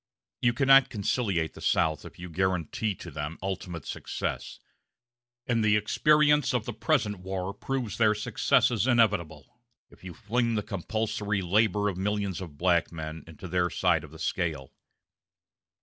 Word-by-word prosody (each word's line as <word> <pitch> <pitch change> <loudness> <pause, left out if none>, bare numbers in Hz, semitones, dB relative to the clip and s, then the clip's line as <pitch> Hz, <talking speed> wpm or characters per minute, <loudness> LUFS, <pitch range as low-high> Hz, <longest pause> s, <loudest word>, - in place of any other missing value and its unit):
You 120 0 +3
cannot 135 +1 +6
conciliate 100 -6 -1
the - - -12
South 80 -2 +1
if - - -11
you 90 - -7
guarantee 95 +3 -1
to 85 - -10
them 75 +2 -5
ultimate 90 -3 -4
success; - - -4 0.9
and 115 -2 +1
the 105 -1 +4
experience 150 +5 +3
of 115 -3 -1
the 120 - -4
present 105 -2 0
war 95 +1 -4
proves 120 -1 -4
their 110 -2 +4
successes 115 +2 +2
inevitable 105 - +1 0.3
if - - -20
you 90 -3 -8
fling 115 +4 0
the 105 - -1
compulsory 100 0 -2
labor 105 +2 +2
of 95 -3 -2
millions 100 -2 -1
of 80 -6 -9
black 85 -1 +2
men 80 -1 -6
into 80 +3 -10
their 90 0 +1
side 85 +1 +1
of 80 - -10
the 80 - -13
scale.... 80 -5 -3
95 Hz, 150 wpm, -28 LUFS, 85-110 Hz, 0.9 s, cannot